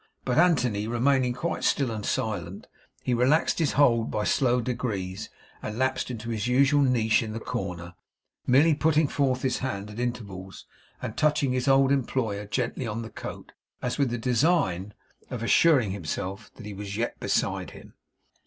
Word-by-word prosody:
But, 125 +4 +2
Anthony 125 - +2
remaining 125 +2 +2
quite 165 +7 -3
still 135 -4 +2
and 110 -2 -4
silent, 100 -4 -3 0.4
he 125 - 0
relaxed 130 +10 +2
his 160 -4 +1
hold 115 -5 +3
by 105 - -1
slow 125 +2 +2
degrees 110 -6 -3 0.3
and 105 - -5
lapsed 130 +1 0
into 115 -1 -5
his 110 0 -2
usual 140 +3 +4
niche 120 -4 +3
in 110 -2 -5
the 115 - -4
corner; 90 -5 -5 0.5
merely 145 +6 +5
putting 155 0 +2
forth 130 -2 0
his 130 - 0
hand 105 -5 -4
at 105 - -8
intervals 100 -6 -5 0.4
and - - -4
touching 150 -3 +2
his 125 +1 -1
old 135 0 +5
employer 115 -6 -1
gently 125 +2 -2
on 115 +2 -3
the 110 - -9
coat, - - -8 0.3
as 125 +3 -3
with 140 -3 +2
the 120 - -2
design 115 - +1 0.3
of 120 -2 -5
assuring 130 - +4
himself 95 +2 -5
that 115 - -11
he 105 - -6
was 100 0 -6
yet 120 +1 -2
beside - - -1
him. - - -14
120 Hz, 170 wpm, -26 LUFS, 105-135 Hz, 0.5 s, merely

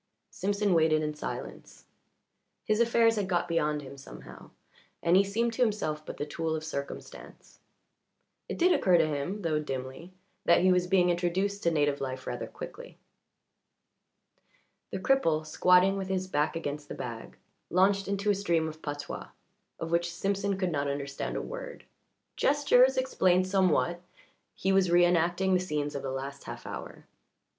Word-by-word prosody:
Simpson 200 0 0
waited 160 -2 +3
in 150 0 -2
silence. 150 - -7 0.8
His 215 0 +1
affairs 230 -1 +4
had 200 -2 -1
got 175 -1 +1
beyond 150 -3 0
him 140 +1 -10
somehow, - - -12 0.5
and 170 +1 +4
he 195 - +6
seemed 230 +4 -1
to 250 - -3
himself 200 -10 0
but - - -7
the 145 - -3
tool 160 +1 -2
of 155 - -4
circumstance. 140 -3 -8 0.9
It - - -4
did 360 +1 +4
occur 180 -2 +4
to 165 - +4
him, 155 +7 -3
though 155 -2 +1
dimly, 135 +4 -6 0.3
that - - +4
he 185 +1 +5
was 180 0 +2
being 180 -1 +4
introduced 185 +4 -1
to 170 - +2
native 145 -3 +1
life 130 -1 -4
rather 120 - -4
quickly. - - -10 1.9
The - - -4
cripple, 165 -9 +2
squatting 180 +4 +4
with 190 -1 -3
his 190 -1 -2
back 150 -2 0
against 145 -2 -5
the - - -5
bag, 115 -2 -7 0.3
launched 195 +2 +3
into 200 +1 0
a - - +3
stream 170 -5 0
of 155 0 -8
patois, 145 -1 -6 0.5
of 165 0 -4
which 170 0 +1
Simpson 195 +2 -1
could 185 -2 -1
not 145 -2 -1
understand 140 0 -4
a - - -3
word. - - -8 0.5
Gestures 265 -2 +4
explained 185 -8 +2
somewhat; 185 -2 +1 0.5
he 190 - 0
was 190 -2 +3
reënacting 175 +2 +3
the 185 - +4
scenes 150 -5 -2
of 140 - -4
the 135 - -4
last 135 +1 -6
half - - -8
hour. - - -8
175 Hz, 160 wpm, -29 LUFS, 150-195 Hz, 1.9 s, he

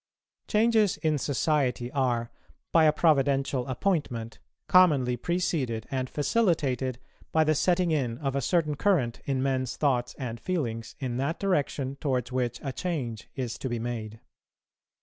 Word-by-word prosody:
Changes 220 -2 +3
in 155 -3 0
society 135 -3 0
are, 120 -4 0 0.4
by 165 -1 +5
a 155 - +6
providential 135 -4 +2
appointment, 130 - -2 0.3
commonly 145 -9 +5
preceded 135 -7 -1
and 130 -1 -2
facilitated 145 - +1 0.3
by 160 - +4
the 155 0 +3
setting 175 +3 +2
in 125 -7 0
of 135 -1 -2
a 140 - +1
certain 155 +3 +1
current 145 -8 +1
in 135 -2 0
men's 130 -2 -1
thoughts 125 -5 0
and 120 -4 -5
feelings 115 -9 -3
in 125 -3 -3
that 140 +6 -1
direction 145 -7 -1
towards 130 -4 -1
which 125 -2 -1
a 135 -2 -3
change 130 - -4
is 125 -3 -4
to 130 - -3
be 120 - -2
made. 115 -2 -5
135 Hz, 145 wpm, -28 LUFS, 125-160 Hz, 0.4 s, a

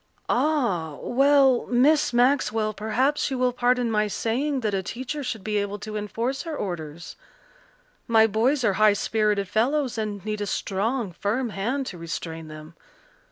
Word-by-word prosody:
"Ah, 240 - +1
well, 270 -1 +3
Miss 285 +5 +3
Maxwell, 240 -4 +2
perhaps 255 +9 0
you 265 - -2
will 250 -1 +1
pardon 245 -1 +1
my 210 -1 +2
saying 260 +7 -1
that 215 -3 -1
a 195 - 0
teacher 260 +9 -5
should 225 -6 -4
be 210 0 -1
able 205 0 -2
to 215 +1 -7
enforce 225 +6 -2
her 325 -3 -5
orders. 165 -3 -6 0.9
My 225 -2 +5
boys 240 +6 +1
are 210 -3 +3
high 215 -1 +6
spirited 210 -1 0
fellows 250 +4 0
and 210 -2 -4
need 210 -1 -3
a 205 - -2
strong, 210 +3 -1
firm 225 +8 -2
hand 240 +8 -2
to 180 -8 -7
restrain 165 -1 -6
them. 155 +1 -11
220 Hz, 160 wpm, -25 LUFS, 205-255 Hz, 0.9 s, high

